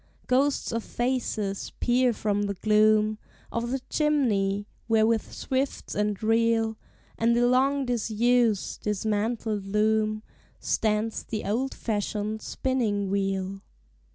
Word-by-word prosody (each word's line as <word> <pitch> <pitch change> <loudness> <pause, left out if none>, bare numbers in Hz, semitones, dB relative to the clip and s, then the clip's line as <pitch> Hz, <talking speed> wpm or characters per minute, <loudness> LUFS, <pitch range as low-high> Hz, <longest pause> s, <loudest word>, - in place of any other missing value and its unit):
Ghosts 275 +3 +1
of 230 -1 -2
faces 235 -5 -2
peer 250 0 +3
from 205 -2 -1
the 200 - -3
gloom 215 +1 +3 0.3
Of 230 +1 -2
the 265 +1 -2
chimney, 210 -10 +1 0.2
where 220 -1 +4
with 225 -1 0
swifts 265 +1 -2
and 210 -1 0
reel, 225 0 +2 0.4
And 230 +1 +3
the 240 - +4
long 270 +3 +3
disused, 235 -2 +1
dismantled 210 0 -1
loom, 215 +1 +1 0.4
Stands 215 0 0
the 215 -2 -5
old 245 +7 -1
fashioned 215 0 -2
spinning 215 -7 -1
wheel. 195 -1 -1
220 Hz, 115 wpm, -27 LUFS, 210-240 Hz, 0.4 s, where